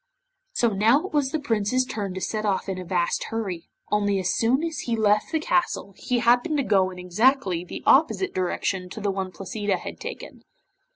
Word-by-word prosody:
So 235 - +2
now 225 - +3
it 385 - -8
was 290 -3 +2
the 315 - -2
Prince's 245 -1 0
turn 200 -6 -4
to 190 - -4
set 215 +2 -2
off 200 -2 0
in 190 -1 -3
a - - -5
vast 175 -1 0
hurry, 195 -7 -4 0.2
only 205 -1 +2
as 185 -1 0
soon 255 +6 +2
as 330 -1 -3
he 235 - -1
left 210 -1 +2
the 320 - +2
Castle 325 - 0
he 250 - -1
happened 245 +6 +3
to 280 - +1
go 195 -5 +3
in 185 - -10
exactly 185 0 +2
the 180 - -8
opposite 325 +7 +3
direction 185 0 -1
to 200 - -7
the 205 -1 0
one 190 -1 -3
Placida 195 +2 -2
had - - -8
taken. - - -8
210 Hz, 205 wpm, -25 LUFS, 190-255 Hz, 0.2 s, now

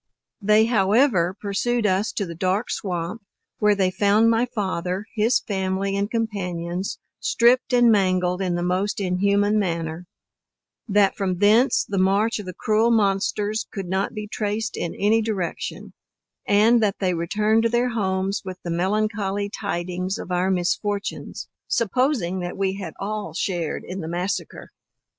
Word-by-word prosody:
They 215 +2 +4
however 205 -4 +2
pursued 215 +3 -1
us 195 +2 +1
to 200 - -2
the 170 - -7
dark 185 +6 -1
swamp, 180 +2 -3 0.4
where 210 -1 +4
they 190 -2 +1
found 205 +4 +3
my 230 +2 +2
father, 190 -4 -3
his 225 +2 +2
family 195 -1 -2
and 200 +1 -1
companions, 185 -5 -3 0.2
stripped 245 +3 +3
and 245 -2 +5
mangled 185 -2 +2
in 180 -2 0
the 175 - -2
most 185 +4 0
inhuman 200 +2 +2
manner: 170 -2 -3 0.8
That 200 -2 +3
from 185 -3 -1
thence 215 +7 +4
the 200 -2 -1
march 200 +4 +2
of 205 - -8
the 185 - -6
cruel 220 +2 +2
monsters 210 0 +1
could 195 -3 -5
not 190 +2 -1
be 210 0 -5
traced 210 +1 -2
in 170 - -4
any 215 +3 +2
direction; 205 -6 -4 0.5
and 220 +3 +5
that 205 -2 +1
they 185 -2 0
returned 210 +6 +1
to 230 - +2
their 240 +2 +1
homes 195 -3 -1
with 185 -2 -6
the 175 - -4
melancholy 200 +2 -1
tidings 185 -1 -3
of 185 - -7
our 180 +1 +1
misfortunes, 200 +3 -2 0.2
supposing 230 - 0
that 175 0 -5
we 190 -1 0
had 195 - -7
all 210 +1 -4
shared 175 -5 -2
in 185 +1 -6
the 160 - -5
massacre. 175 +3 -4
200 Hz, 150 wpm, -23 LUFS, 185-215 Hz, 0.8 s, and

